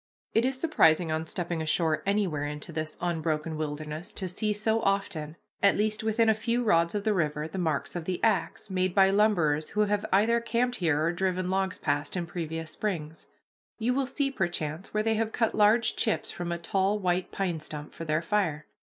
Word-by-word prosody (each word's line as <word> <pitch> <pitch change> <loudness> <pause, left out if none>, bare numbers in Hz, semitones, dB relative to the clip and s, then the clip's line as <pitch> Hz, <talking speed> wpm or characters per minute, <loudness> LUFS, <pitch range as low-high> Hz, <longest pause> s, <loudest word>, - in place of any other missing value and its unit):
It 225 +2 +3
is 260 0 -1
surprising 170 - +3
on 160 +1 -2
stepping 170 -1 -3
ashore 155 0 +1
anywhere 185 -8 0
into 150 +2 -6
this 155 -1 -4
unbroken 160 -2 -1
wilderness 155 +2 -5
to 190 - -3
see 210 +4 -1
so 220 +2 +1
often, 185 -7 -1 0.2
at 200 - +5
least 215 +1 0
within 220 +1 +2
a 220 - +6
few 230 +3 -1
rods 170 -4 +3
of 205 - -1
the 215 -1 +2
river, 150 -4 -1
the 175 +4 -5
marks 160 -3 -1
of 170 -2 -4
the 180 0 -2
axe, 215 -1 0
made 185 -1 0
by 195 -1 +6
lumberers 175 -8 +2
who 210 - 0
have 205 -1 +1
either 220 +5 +4
camped 245 +1 0
here 160 -5 +1
or 165 - +2
driven 185 0 -1
logs 190 -1 0
past 145 +3 -1
in 175 - -2
previous 165 -2 -4
springs. 160 -5 -4 0.5
You 240 +2 +1
will 270 0 0
see 275 +1 -1
perchance 175 - -3
where 215 0 0
they 225 0 +2
have 220 0 0
cut 225 -1 +1
large 220 +3 +4
chips 220 - 0
from 175 -1 -4
a 170 - -1
tall 195 +4 +1
white 180 -2 -1
pine 180 -4 -2
stump 150 -1 -7
for - - -7
their 155 +1 0
fire. 170 -6 0
185 Hz, 200 wpm, -28 LUFS, 160-210 Hz, 0.5 s, a